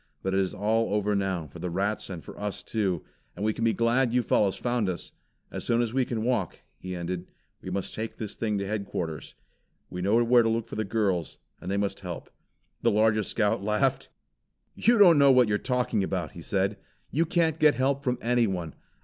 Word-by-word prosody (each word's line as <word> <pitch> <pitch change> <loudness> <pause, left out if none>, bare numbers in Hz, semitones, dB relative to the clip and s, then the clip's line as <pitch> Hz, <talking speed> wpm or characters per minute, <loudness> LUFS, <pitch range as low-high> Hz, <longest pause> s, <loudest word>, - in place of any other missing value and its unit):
But 95 - -1
it 95 - +3
is 95 -1 0
all 110 +2 +1
over 105 0 +1
now, 95 -4 -1
for 70 - -12
the 90 - -3
rats 100 +5 -1
and 90 -4 -6
for - - -10
us 105 -1 -4
too; 95 -7 -1 0.3
and 105 - -3
we 110 - +2
can 115 - -4
be 115 - +4
glad 115 +2 +2
you 125 - +3
fellows 100 -3 +2
found 120 -5 0
us. 90 -2 -5 0.4
As - - -5
soon 120 0 +1
as 115 -1 -3
we 130 -1 +2
can 115 -3 -3
walk," 115 -7 -1 0.2
he 90 0 -5
ended, 90 +1 -4 0.3
"we - - -7
must 95 +1 -3
take 110 +1 -5
this 105 -2 -5
thing 105 -3 -1
to 100 - -2
headquarters. 95 -6 -4 0.6
We 90 - -4
know 110 +6 +3
where 120 +1 +5
to 115 - +1
look 115 0 -1
for - - -7
the 110 - -1
girls, 95 - -1 0.2
and 90 - -7
they 100 - 0
must 100 -1 -1
help." 90 -3 -7 0.5
The - - +3
largest 110 -1 +2
Scout 110 0 +1
laughed. 105 0 0 0.6
"You 235 +2 +3
don't 175 -7 +7
know 140 -1 +7
what 125 -2 +5
you 105 - 0
are - - +3
talking 125 -5 0
about," 90 -4 -2
he 85 - -10
said. 100 +3 0 0.3
"You 165 +3 +1
can't 165 -2 +1
get 150 -1 +5
help 135 +1 +1
from 125 -2 0
anyone. 105 -9 0
105 Hz, 215 wpm, -27 LUFS, 95-120 Hz, 0.6 s, don't